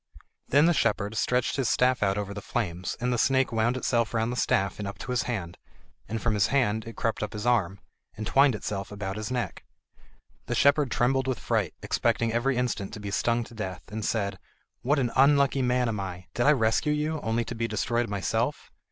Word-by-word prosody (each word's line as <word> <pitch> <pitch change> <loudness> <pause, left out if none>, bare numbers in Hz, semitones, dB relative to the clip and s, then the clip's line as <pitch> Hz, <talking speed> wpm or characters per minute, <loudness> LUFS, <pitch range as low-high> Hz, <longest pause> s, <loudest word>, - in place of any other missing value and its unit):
Then 145 +3 +5
the 175 - +4
shepherd 105 -7 0
stretched 125 +3 0
his 130 -3 +1
staff 125 0 +2
out 100 -1 +1
over 100 -1 -3
the 100 - -6
flames 90 -7 -3
and 125 +1 0
the 120 - 0
snake 130 +1 +2
wound 115 +2 +1
itself 120 -2 0
round 115 +1 +1
the - - -3
staff 100 -5 0
and 100 - -3
up 100 - -6
to - - -6
his 120 -4 0
hand, 90 -8 -4 0.5
and 115 +1 -2
from 115 0 0
his 100 -2 +3
hand 110 -6 +1
it 115 - -8
crept 115 - -1
up 105 - -3
his 105 +1 -5
arm, 100 -6 +1 0.4
and 110 - -4
twined 135 -1 +4
itself 100 -2 -4
about 100 -1 -4
his 110 -1 -4
neck. 125 -1 -3 0.8
The - - -1
shepherd 140 0 +4
trembled 130 +1 +1
with 130 -3 0
fright, - - -1
expecting 115 -1 0
every 125 +2 +1
instant 120 -6 -2
to - - -6
be 100 -1 -5
stung 120 +3 +1
to 115 - -13
death, 95 -7 -5
and 110 0 -4
said: 100 -4 -1 0.4
"What 145 +5 +2
an 125 -4 0
unlucky 140 0 +4
man 125 0 +2
I 100 -4 -3
am! 90 - -14
Did 120 - +1
I - - +8
rescue 120 +4 +2
you 150 +1 -1
only 115 +1 0
to - - -5
be 115 0 -2
destroyed 115 +2 -1
myself?" 100 -3 -2
115 Hz, 215 wpm, -27 LUFS, 105-125 Hz, 0.8 s, I